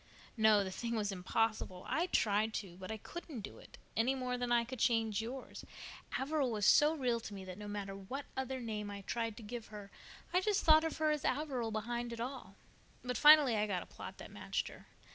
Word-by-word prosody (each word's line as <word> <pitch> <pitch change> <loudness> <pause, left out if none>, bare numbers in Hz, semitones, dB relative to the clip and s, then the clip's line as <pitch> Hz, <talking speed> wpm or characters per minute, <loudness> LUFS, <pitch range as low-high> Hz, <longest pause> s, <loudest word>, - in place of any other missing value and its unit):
"No, 215 -3 +5
the 190 - -4
thing 235 +4 -3
was 210 -2 0
impossible. 190 0 -1
I 340 +3 +1
tried 215 - +2
to, 190 -4 -5
but 185 +2 -7
I 220 - -3
couldn't 300 +1 -7
do - - -9
it, - - -14 0.2
any 245 +4 +2
more 255 -1 -2
than 245 -1 -2
I 240 -1 +4
could 255 +1 -7
change 225 -3 +2
yours. 250 +4 -7 0.6
Averil 280 -1 0
was 210 -3 -1
so 300 +7 +6
real 250 -5 0
to 215 -2 -8
me 190 -1 -7
that 185 +1 -8
no 210 - -7
matter 200 -1 -4
what 255 +9 -6
other 265 0 -2
name 215 -3 -4
I 200 0 -6
tried 230 +1 -3
to 230 - -9
give 230 +1 -6
her 205 -2 -10 0.4
I 365 - +4
just 415 0 +1
thought 315 0 +7
of 320 - -2
her 310 -1 +2
as 300 -2 -1
Averil 265 -6 -1
behind 235 +2 -3
it 230 - -7
all. 240 -5 -5 0.5
But 250 0 -2
finally 295 -2 +8
I 210 0 +1
got 185 -4 -1
a - - -16
plot - - -9
that - - -10
matched - - -2
her. - - -14
230 Hz, 220 wpm, -35 LUFS, 210-265 Hz, 0.6 s, finally